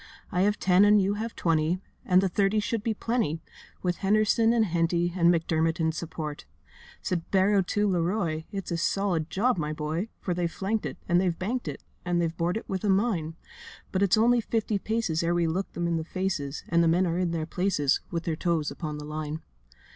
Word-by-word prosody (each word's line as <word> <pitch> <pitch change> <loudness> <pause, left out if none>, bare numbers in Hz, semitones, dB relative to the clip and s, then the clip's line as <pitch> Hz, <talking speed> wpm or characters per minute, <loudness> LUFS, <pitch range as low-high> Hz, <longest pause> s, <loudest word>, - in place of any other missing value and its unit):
I 180 -3 +1
have 205 +2 +2
ten 185 +1 +4
and 210 0 +6
you 195 +1 +2
have 225 +2 -4
twenty, 165 +1 +1 0.3
And 185 0 +5
the - - +3
thirty 195 +3 +2
should 225 +1 -1
be 220 0 -1
plenty, 225 -10 -1 0.4
With 180 -1 0
Henderson 215 +3 +3
and 230 -2 +3
Henty 170 -1 +1
And 170 -1 +5
McDermott 165 -1 +1
in 160 -1 +2
support.' 155 -2 -6 0.6
Said 175 -3 -2
Barrow 195 +1 +4
to 205 +3 0
Leroy, 170 -3 0
'It's 195 -4 -5
a 170 - 0
solid 175 -2 0
job, 220 0 +1
my 150 0 -2
boy, 155 +7 -3
For 180 - -2
they've 170 -1 -1
flanked 205 +5 -2
it, - - -7
and 175 0 +3
they've 175 -3 0
banked 235 +3 -3
it, 145 - -6 0.2
And 175 -1 0
they've 165 -1 0
bored 175 +3 0
it - - -7
with 190 -1 -3
a 210 - +1
mine. 190 -6 +1 0.6
But 190 - 0
it's 200 0 +4
only 235 +2 +4
fifty 220 -2 -1
paces 220 -7 -1
Ere 170 +1 +1
we 175 -1 +2
look 180 +4 -2
them 175 - -2
in 170 -1 +1
the 160 - -2
faces; 170 -5 -3
And 170 0 +3
the - - +3
men 175 +3 +3
are 170 0 -1
in 180 -2 +1
their 165 -2 -2
places, 170 -5 +1
With 170 -1 -3
their 165 - -1
toes 165 -3 0
upon 155 -2 -5
the 150 - -7
line. 155 +1 -5
175 Hz, 215 wpm, -27 LUFS, 165-200 Hz, 0.6 s, and